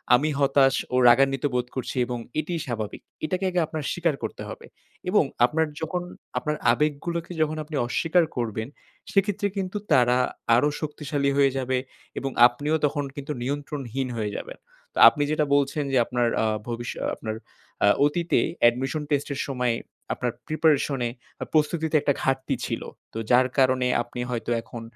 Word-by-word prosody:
"আমি 145 +5 +1
হতাশ 135 -1 +4 0.2
ও - - +2
রাগান্বিতবোধ 135 0 +3
করছি 130 - -4
এবং 125 0 -3 0.2
এটিই 165 +2 -2
স্বাভাবিক।" 110 -5 -4 0.2
এটাকে 185 +4 -2
আগে 180 - 0
আপনার 155 -1 -4
স্বীকার 170 -4 0
করতে 110 - -5
হবে। - - -9 0.4
এবং 205 -1 +4 0.2
আপনার 160 +5 +1 0.2
যখন 175 +3 -2 0.4
আপনার 150 0 -1 0.2
আবেগগুলোকে 165 +3 -1
যখন 155 0 +1
আপনি 150 0 -7
অস্বীকার 165 +7 +2
করবেন, 110 -2 -2 0.4
সেক্ষেত্রে 200 0 +1
কিন্তু 190 +1 -2
তারা 125 -1 +5 0.4
আরো 125 +5 +4
শক্তিশালী 145 -2 -1
হয়ে 140 -1 +5
যাবে 130 0 0 0.4
এবং 135 -1 -3 0.2
আপনিও 145 +6 -2
তখন 145 0 0
কিন্তু 145 +1 -5
নিয়ন্ত্রণহীন 135 -1 -3
হয়ে 105 -2 -2
যাবেন। - - -7 0.4
তো - - -12
আপনি 145 - -2
যেটা 155 -1 +2
বলছেন 145 +1 +1
যে, - - +4
আপনার 120 0 0 0.2
আ - - +2 0.2
ভবিষ্য 120 0 -4
আ - - 0
আপনার 110 -1 -5 0.5
আ - - +5 0.2
অতীতে 170 +3 +1 0.3
admission 135 +5 -3
test 145 -1 +1
এর - - -5
সময়ে 125 -3 0 0.4
আপনার 125 -1 -2 0.2
preparation 150 -3 +2
এ - - -3 0.3
আ - - -2
প্রস্তুতিতে 160 +1 +1
একটা 140 - +2
ঘাটতি 135 0 0
ছিল। - - -3 0.3
তো - - -6
যার 125 +1 +5
কারণে 130 -1 +3
আপনি 120 +1 -8
হয়তো 120 -1 -3
এখন 115 +1 -9
140 Hz, 160 wpm, -25 LUFS, 125-155 Hz, 0.5 s, তারা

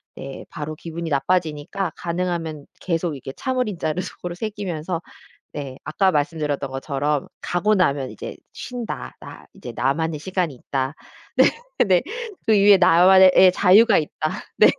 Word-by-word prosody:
네 135 0 -8
바로 155 -1 -5
기분이 165 +1 -6
나빠지니까 160 +4 -1
가능하면 170 -4 -3
계속 165 -3 -2
이렇게 135 0 -7
참을 255 -2 -1
인자를 175 -3 -2
속으로 175 -1 -7
새기면서 180 -5 -4 0.5
네 135 -3 -6
아까 195 -1 +2
말씀드렸던 145 -2 -1
것처럼 140 +1 -2
'가고 210 +5 +1
나면 140 -9 +1
이제 - - -8 0.2
쉰다. 245 -3 -6
나 - - -11
이제 120 - -9
나만의 150 +5 0
시간이 180 -2 -2
있다.' 130 +2 -3 0.9
네네 185 -4 +4 0.4
'그 225 - +4
위에 200 -1 +6
나만의 185 +1 +7
예 185 0 +8
자유가 200 +4 +5
있다.' 155 0 -2 0.3
네. - - +7
170 Hz, 315 characters per minute, -22 LUFS, 145-185 Hz, 0.9 s, 예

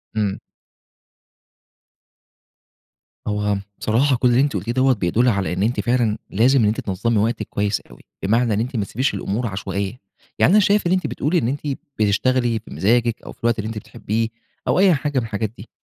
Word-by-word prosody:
امم. 105 -3 0 2.9
هو 105 -1 0 0.2
بصراحة 130 +5 +2
كل 125 +1 +2
اللي 120 +2 +4
أنتِ 140 0 +1
قُلتيه 120 - -2
دوّة 130 +2 +3
بيدُل 110 +3 +1
على 100 -6 0
إن 95 +2 -1
أنتِ 120 +4 0
فعلًا 120 -3 +1
لازم 125 +6 +3
إن - - +4
أنتِ 105 - 0
تنظّمي 110 +4 -1
وقتِك 115 +3 0
كويس 100 0 -1
أوي؛ - - -17 0.2
بمعنى 115 +3 +2
إن 105 - 0
أنتِ 125 +4 -3
ما 105 -3 0
تسيبيش 130 +6 -1
الأمور 105 +4 -2
عشوائية. 100 +2 -4 0.4
يعني - - +5
أنا 210 - +6
شايف 205 -1 +3
إن - - 0
أنتِ 185 0 +1
بتقولي 155 +6 0
إن 135 - +1
أنتِ 140 +4 -3 0.3
بتشتغلي 115 +3 +2
بمزاجك 115 +2 +1
أو - - -8
في - - -17
الوقت 115 -1 +2
اللي 110 - -2
أنتِ 110 0 -5
بتحبيه 110 +1 -2 0.4
أو - - +2
أي 190 -2 +6
حاجة 145 -1 -1
من 120 - -3
الحاجات 110 -1 -3
دي. 110 - -11
115 Hz, 185 wpm, -21 LUFS, 105-130 Hz, 2.9 s, أنا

